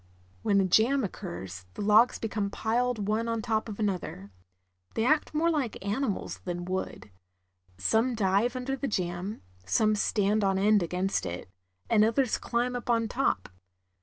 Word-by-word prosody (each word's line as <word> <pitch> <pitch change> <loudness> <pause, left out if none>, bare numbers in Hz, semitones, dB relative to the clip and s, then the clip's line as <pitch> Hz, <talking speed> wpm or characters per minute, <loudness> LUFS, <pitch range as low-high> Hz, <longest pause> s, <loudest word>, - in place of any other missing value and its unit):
When 200 - +3
a 195 - +3
jam 235 +9 +3
occurs, 95 - -6
the - - -4
logs 215 +4 +5
become 210 -2 -2
piled 225 0 -1
one 220 +2 0
on 230 0 -1
top 220 -1 -1
of 210 - -7
another. 180 - -3 0.6
They 225 - +1
act 305 +3 +2
more 335 +2 +3
like 265 -10 -2
animals 210 +1 -2
than 175 -1 -4
wood. 185 - -4 0.7
Some 225 - +2
dive 210 +4 +2
under 255 +1 -2
the 275 +1 -3
jam, 180 0 -3 0.2
some 215 - +2
stand 210 0 +1
on 195 -1 +2
end 205 +1 +4
against 180 +3 -1
it, 90 +1 -6 0.4
and 210 -1 +4
others 230 +3 +2
climb 245 +1 -1
up 245 0 -5
on 230 -2 +2
top. 240 - 0
215 Hz, 160 wpm, -28 LUFS, 190-235 Hz, 0.7 s, logs